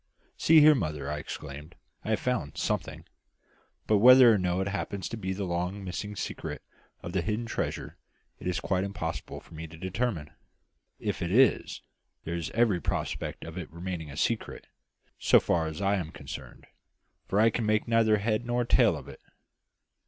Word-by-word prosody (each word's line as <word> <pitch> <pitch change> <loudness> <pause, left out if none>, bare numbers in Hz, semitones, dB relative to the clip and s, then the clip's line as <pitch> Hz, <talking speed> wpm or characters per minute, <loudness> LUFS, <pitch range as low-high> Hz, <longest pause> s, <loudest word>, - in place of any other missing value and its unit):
"See 160 -1 +6
here, 155 +1 +8
mother!" 75 - -2
I 75 - -3
exclaimed. 75 +2 -8 0.3
"I - - -5
have - - +2
found - - -2
something; - - -2 0.8
but 105 -2 +3
whether 125 +1 +9
or 105 - +2
no 90 0 0
it 95 - -1
happens 100 -1 -3
to - - -4
be 95 -4 -4
the 95 +1 -3
long 90 +3 -2
missing 105 +3 -5
secret - - -5 0.4
of 85 - -5
the 95 - +1
hidden 110 +4 -2
treasure 115 - -4 0.4
it - - -6
is 90 - 0
quite 95 -1 0
impossible 85 -5 -4
for - - -18
me 80 +1 -7
to 80 +1 -12
determine. 95 -3 -2 0.7
If - - -3
it 85 0 -2
is, 130 +6 +3 0.4
there 85 - -4
is 85 -2 -3
every 110 -7 +3
prospect - - -3
of 80 +2 -6
its 85 - -8
remaining 85 -2 -5
a 70 - -9
secret, 115 +7 -1 0.5
so - - +6
far 80 -2 0
as 80 +5 -5
I 100 +1 +2
am 85 -4 -4
concerned, - - -9 0.6
for 100 - +1
I 115 +1 +5
can 110 0 -1
make 110 +1 +1
neither 115 -2 +4
head 110 +2 0
nor 120 0 0
tail - - +4
of - - -10
it." - - -11
95 Hz, 180 wpm, -28 LUFS, 85-110 Hz, 0.8 s, whether